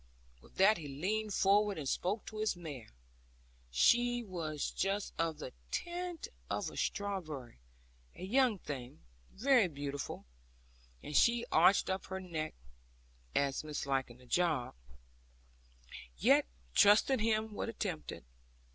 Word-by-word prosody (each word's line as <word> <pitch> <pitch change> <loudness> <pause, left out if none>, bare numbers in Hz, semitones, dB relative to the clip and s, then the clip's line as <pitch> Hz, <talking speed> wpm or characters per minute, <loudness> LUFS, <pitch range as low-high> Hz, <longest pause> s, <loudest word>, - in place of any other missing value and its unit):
With - - -20
that 195 +2 +5
he 150 - -7
leaned 205 +10 -2
forward, 200 +1 +3
and 145 -3 -4
spoke 200 - -1
to 215 - -7
his 215 -2 +1
mare 150 -9 -8 0.8
she 240 - +3
was 165 -7 -3
just 195 +2 -1
of 165 -2 0
the 140 -4 -7 0.2
tint 350 0 -4 0.2
of - - -2
a - - -12
strawberry, 160 - -3 0.6
a - - -9
young 240 +2 +3
thing, 135 -5 -7 0.3
very 245 -2 +4
beautiful 145 -3 -5 0.8
and 150 - -6
she 235 +6 +4
arched 180 +5 +5
up 190 0 -2
her 190 0 -4
neck, 160 -4 -4 0.8
as 140 -1 +1
misliking 135 -5 -2
the 125 - -18
job; 155 -3 +1 1.4
yet, - - +4 0.3
trusting 220 +6 +5
him, 220 0 +1
would 220 - -3
attempt 190 -8 -3
it. - - -9
185 Hz, 130 wpm, -34 LUFS, 150-215 Hz, 1.4 s, that